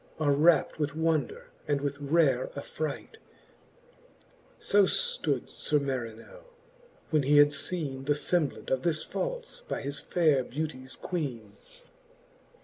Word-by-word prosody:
Are 145 -2 +3
rapt 160 +3 +3
with 145 -1 -1
wonder, 165 - -1 0.2
and 145 -1 +1
with 140 0 -3
rare 145 -3 +2
afFi 150 +2 -3
ight: 440 - -11 1.4
So 205 -1 +4
ftood 485 - 0
Sir 150 - 0
Marinell, 130 - -5 0.7
when 155 -2 +4
he 145 +2 +4
had 145 0 +8
feene 140 -2 -3
The 145 - +4
femblant 150 +1 -1
of 130 -1 +1
this 155 -1 0
falfe - - -4
by - - -3
his 140 +1 -4
faire 155 -7 +2
beauties 130 -1 -5
Queene. 125 - -4
150 Hz, 130 wpm, -29 LUFS, 140-170 Hz, 1.4 s, had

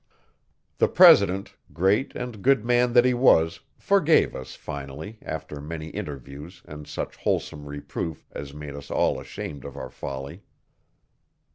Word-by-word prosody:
The - - +5
president, 95 +2 +6 0.2
great 95 +9 +1
and 125 -5 -6
good 135 -2 +3
man 120 0 +3
that 120 0 +6
he 125 - +4
was, 85 -10 +4 0.2
forgave 190 -5 +3
us, 65 - -8
finally, 75 +8 -8
after 75 -1 -6
many 80 +1 -6
interviews 75 +6 -8
and 75 0 -10
such - - -5
wholesome 75 0 -2
reproof 75 +2 -5
as 70 -1 -7
made 75 0 -8
us 70 0 -9
all - - +1
ashamed 70 -3 -7
of 70 -2 -9
our - - -7
folly. 70 +7 -7
80 Hz, 140 wpm, -25 LUFS, 70-110 Hz, 0.2 s, president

